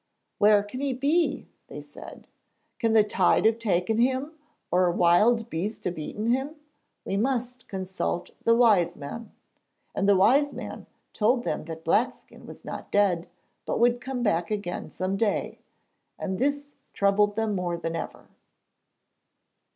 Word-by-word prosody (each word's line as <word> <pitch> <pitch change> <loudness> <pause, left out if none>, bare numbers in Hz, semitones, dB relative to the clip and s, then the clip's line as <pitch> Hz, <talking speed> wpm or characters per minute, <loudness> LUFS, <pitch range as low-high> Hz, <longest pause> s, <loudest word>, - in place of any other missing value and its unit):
'Where 205 0 +5
can 205 +5 -8
he 280 -2 0
be?' 295 +7 0 0.2
they - - -8
said. - - -12 0.5
'Can 230 -3 +1
the 220 -1 +6
tide 195 -2 +2
have 225 +1 +3
taken 215 0 0
him, 260 +4 +1 0.4
or 180 +1 +3
a - - +2
wild 210 +7 +3
beast 205 +2 -4
have 175 -2 -2
eaten 210 +9 -2
him? 270 +5 -1 0.5
We 195 - -2
must 250 +1 -2
consult 190 -2 -3
the 230 - +4
wise 205 -8 +4
man.' 205 +10 -8 0.6
And 195 - +1
the 200 - +6
wise 275 +10 +4
man - - -8 0.3
told 240 +3 +2
them - - -3
that 165 0 -8
Blackskin 215 +9 -1
was - - -12
not - - -7
dead, 185 -4 +2 0.3
but - - -2
would 240 +1 +3
come 255 -2 -4
back 175 -6 +1
again 205 -4 -4
some 185 +1 -3
day; 210 -1 -1 0.6
and 190 -1 -4
this 285 +1 -1 0.2
troubled 205 +1 +2
them 220 -1 0
more 180 -3 -2
than 165 0 -4
ever. 165 - -6
210 Hz, 150 wpm, -26 LUFS, 185-245 Hz, 0.6 s, the